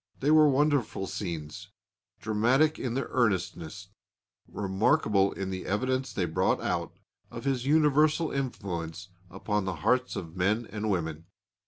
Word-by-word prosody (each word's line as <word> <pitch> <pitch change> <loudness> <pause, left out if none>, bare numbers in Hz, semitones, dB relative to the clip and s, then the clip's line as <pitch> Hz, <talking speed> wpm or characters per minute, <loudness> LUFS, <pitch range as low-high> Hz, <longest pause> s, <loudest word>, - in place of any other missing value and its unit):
They 145 +3 +2
were 155 -1 +7
wonderful 140 -7 +1
scenes, 80 -7 -5 0.5
dramatic 120 +8 +2
in 125 -2 -3
their 135 - -1
earnestness, 95 -5 -1 0.6
remarkable 100 0 +1
in 95 -1 -4
the 95 0 -5
evidence 130 +5 -1
they 95 -4 -1
brought 80 - +1
out - - -3 0.3
of - - -8
his 135 -2 -1
universal 155 +1 +3
influence 95 -9 -4 0.2
upon 100 +2 -2
the 95 -2 -2
hearts 125 0 +2
of 80 -1 -6
men 105 +6 +1
and 105 0 -3
women. 80 -4 -2
105 Hz, 135 wpm, -28 LUFS, 95-135 Hz, 0.6 s, were